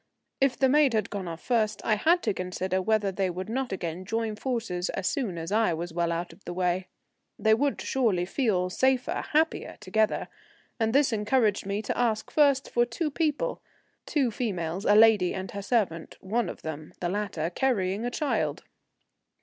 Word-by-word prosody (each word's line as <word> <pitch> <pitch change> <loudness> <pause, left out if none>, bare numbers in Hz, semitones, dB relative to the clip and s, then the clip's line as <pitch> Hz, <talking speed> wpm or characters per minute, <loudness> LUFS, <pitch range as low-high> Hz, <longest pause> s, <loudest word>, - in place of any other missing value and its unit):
If 270 -2 +2
the 265 - +4
maid 280 -2 +4
had 215 - 0
gone 195 -3 -4
off 165 -1 -7
first, 220 -3 +1
I 220 - +3
had 330 - +3
to 215 - +1
consider 185 +1 -2
whether 215 0 +1
they 190 0 -1
would 185 +4 -5
not 260 +2 -2
again 175 -1 -4
join 225 +2 -2
forces 225 -7 -2
as 190 - -3
soon 230 - -1
as 165 +2 -5
I 215 -5 +2
was 170 +1 -5
well 170 0 0
out 170 +1 -3
of - - -21
the 175 - -6
way. 180 0 0 0.5
They 220 0 +3
would 280 +5 +1
surely 215 -9 +1
feel 185 -4 0
safer, 260 +3 +1
happier, 320 +2 +1
together, 215 +3 0 0.5
and 225 -1 +2
this 270 -1 +3
encouraged 210 -2 +1
me 200 +2 -2
to - - -2
ask 225 -3 0
first 280 -3 +3
for 240 - +3
two 295 +6 -2
people, 325 - -1 0.5
two 275 -6 +1
females, 190 -6 -3
a 205 - +5
lady 215 -4 +5
and 190 -1 -5
her 200 - -5
servant, 195 -7 -1
one 215 +2 -1
of - - -9
them, 155 +1 -6
the 175 - -1
latter, 180 -4 -2
carrying 200 -3 0
a 245 - 0
child. 290 +3 -1
210 Hz, 185 wpm, -27 LUFS, 185-245 Hz, 0.5 s, a